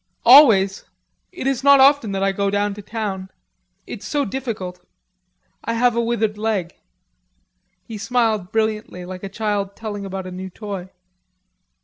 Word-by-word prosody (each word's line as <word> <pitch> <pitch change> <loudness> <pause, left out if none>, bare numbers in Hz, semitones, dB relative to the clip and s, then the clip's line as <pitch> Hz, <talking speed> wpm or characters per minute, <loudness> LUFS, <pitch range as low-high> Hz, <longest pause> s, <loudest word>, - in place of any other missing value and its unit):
"Always. 225 -7 +7 0.5
It 360 -7 -7
is 270 -1 0
not 280 0 +7
often 270 -5 +5
that 195 0 -1
I 195 - +2
go 200 +1 -1
down 205 0 0
to 210 - -9
town.... 200 -3 -5 0.6
It's - - -8
so 290 -2 0
difficult.... 195 -7 -5 0.8
I 230 - -2
have 240 0 +2
a 235 - +2
withered 225 -3 -1
leg." 205 -6 -1 1.1
He 220 -2 -8
smiled 220 -3 0
brilliantly 215 -4 -2
like 185 0 -8
a 195 - -5
child 200 -1 -2
telling 210 -2 -6
about 190 -1 -5
a 185 - -7
new 185 +1 -7
toy. 195 -2 -7
210 Hz, 150 wpm, -21 LUFS, 195-230 Hz, 1.1 s, Always